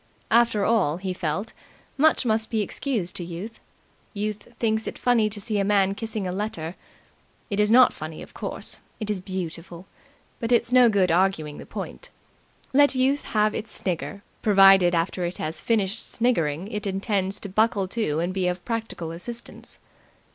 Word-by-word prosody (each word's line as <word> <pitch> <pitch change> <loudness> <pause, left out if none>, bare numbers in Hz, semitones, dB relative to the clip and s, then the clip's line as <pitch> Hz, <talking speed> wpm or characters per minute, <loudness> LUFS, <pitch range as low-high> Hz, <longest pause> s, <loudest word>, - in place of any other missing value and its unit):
After 230 -3 +4
all, 185 -9 +2
he 185 0 -3
felt, 180 +4 -3 0.4
much 305 -2 +3
must 220 -1 +1
be 220 -2 0
excused 215 -5 -2
to 175 - -4
Youth. 175 +7 -7 0.6
Youth 210 +2 -4
thinks 220 -1 0
it - - -5
funny 235 -4 +3
to 210 0 -6
see 210 0 -1
a - - +2
man 195 -1 +3
kissing 220 -1 -4
a 180 - -2
letter. 185 -4 -4 0.8
It 200 - -1
is 210 0 +3
not 250 +2 +7
funny, 155 0 -7
of - - -14
course; - - -5 0.2
it 215 -2 -2
is 195 -3 -3
beautiful; 175 -1 -6 0.5
but 230 +1 -3
it's 235 0 +3
no 250 -1 +7
good 190 -5 +2
arguing 165 -4 +1
the - - -10
point. - - -7 0.6
Let 285 0 +5
Youth 265 +3 +1
have 215 -1 +1
its 215 - -5
snigger, 195 +2 -3 0.2
provided, 195 -3 +6
after 170 +2 -1
it 175 +1 -3
has 155 +1 -4
finished 215 -2 0
sniggering, 180 -8 0
it 210 -1 -3
intends 195 0 -1
to - - -5
buckle 200 0 +1
to 190 -9 -1
and 175 +2 -1
be 185 -1 0
of 180 0 -3
practical 225 -8 -3
assistance. 230 +8 -8
200 Hz, 170 wpm, -25 LUFS, 180-225 Hz, 0.8 s, not